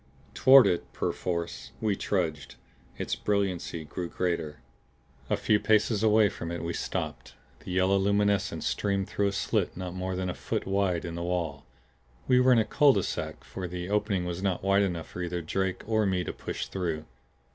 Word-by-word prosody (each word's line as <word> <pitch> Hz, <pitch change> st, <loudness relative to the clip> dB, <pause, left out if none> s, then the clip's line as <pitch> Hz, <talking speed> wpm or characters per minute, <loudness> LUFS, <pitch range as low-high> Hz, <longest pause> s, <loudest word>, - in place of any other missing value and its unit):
Toward 135 Hz, -1 st, +8 dB
it, 85 Hz, -, 0 dB
perforce, 85 Hz, -7 st, -3 dB
we 105 Hz, -2 st, +1 dB
trudged. 80 Hz, -9 st, -2 dB, 0.4 s
Its -, -, -3 dB
brilliancy 95 Hz, -5 st, -1 dB
grew 85 Hz, +3 st, -5 dB
greater. 85 Hz, -5 st, -2 dB, 0.7 s
A -, -, +2 dB
few 105 Hz, -, +2 dB
paces 110 Hz, 0 st, +2 dB
away 110 Hz, -1 st, +5 dB
from 85 Hz, -3 st, -5 dB
it 85 Hz, -, -4 dB
we 85 Hz, 0 st, -2 dB
stopped. -, -, -4 dB, 0.2 s
The -, -, -11 dB
yellow 95 Hz, +1 st, +3 dB
luminescence 100 Hz, -3 st, +1 dB
streamed 100 Hz, -2 st, 0 dB
through 100 Hz, -, 0 dB
a -, -, 0 dB
slit 100 Hz, -, -1 dB
not 90 Hz, -1 st, -5 dB
more 95 Hz, 0 st, -3 dB
than 90 Hz, 0 st, -2 dB
a 90 Hz, -, -2 dB
foot -, -, -3 dB
wide 95 Hz, -3 st, 0 dB
in 85 Hz, -, -5 dB
the 85 Hz, -, -4 dB
wall. 85 Hz, -5 st, -3 dB, 0.6 s
We 125 Hz, -1 st, +5 dB
were 130 Hz, 0 st, +5 dB
in 125 Hz, -, +6 dB
a 110 Hz, -, +3 dB
cul 145 Hz, +5 st, +5 dB
de -, -, +1 dB
sac -, -, -4 dB
for 95 Hz, -1 st, -6 dB
the 90 Hz, +2 st, -5 dB
opening 105 Hz, -3 st, +1 dB
was 90 Hz, +1 st, -4 dB
not 95 Hz, -2 st, -1 dB
wide 100 Hz, +1 st, +4 dB
enough 90 Hz, -5 st, -1 dB
for 90 Hz, -, -6 dB
either 90 Hz, 0 st, -3 dB
Drake 95 Hz, +3 st, -2 dB
or 110 Hz, -1 st, +2 dB
me 95 Hz, -2 st, +1 dB
to -, -, -4 dB
push -, -, -5 dB
through. 80 Hz, -5 st, -3 dB
95 Hz, 190 wpm, -28 LUFS, 85-100 Hz, 0.7 s, Toward